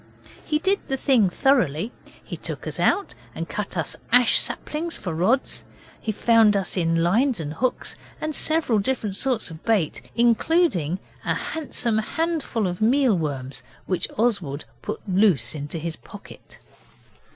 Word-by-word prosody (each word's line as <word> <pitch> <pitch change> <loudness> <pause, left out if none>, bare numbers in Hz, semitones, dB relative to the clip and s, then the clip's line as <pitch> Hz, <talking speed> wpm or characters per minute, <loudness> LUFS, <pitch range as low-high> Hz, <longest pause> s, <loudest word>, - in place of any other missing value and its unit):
He 300 - 0
did 385 +5 +1
the 270 - -1
thing 250 -8 +3
thoroughly. 220 - +2 0.3
He - - -6
took - - -5
us - - -3
out 405 - +2 0.2
and - - -4
cut - - -4
us - - -1 0.2
ash 245 -1 +6
saplings 330 +3 0
for 180 - -4
rods; 205 +12 +1 0.4
he 220 - -2
found 220 -1 +4
us 195 - -2
in 165 -2 +1
lines 230 +7 +2
and 150 -2 -4
hooks, 255 +10 -2 0.2
and 310 0 -3
several 310 -8 +2
different 210 -2 -1
sorts 245 -6 0
of 160 0 -11
bait, 210 -9 +1
including 235 - +2 0.3
a - - 0
handsome 245 -8 -2
handful 310 -3 -1
of 180 +1 -3
meal 250 0 +4
worms, 135 -5 -3 0.2
which 185 -1 -1
Oswald 195 - 0 0.2
put - - -5
loose 185 - +2
in 145 -2 -5
his 165 0 -4
pocket. - - -13
220 Hz, 150 wpm, -24 LUFS, 170-265 Hz, 0.4 s, ash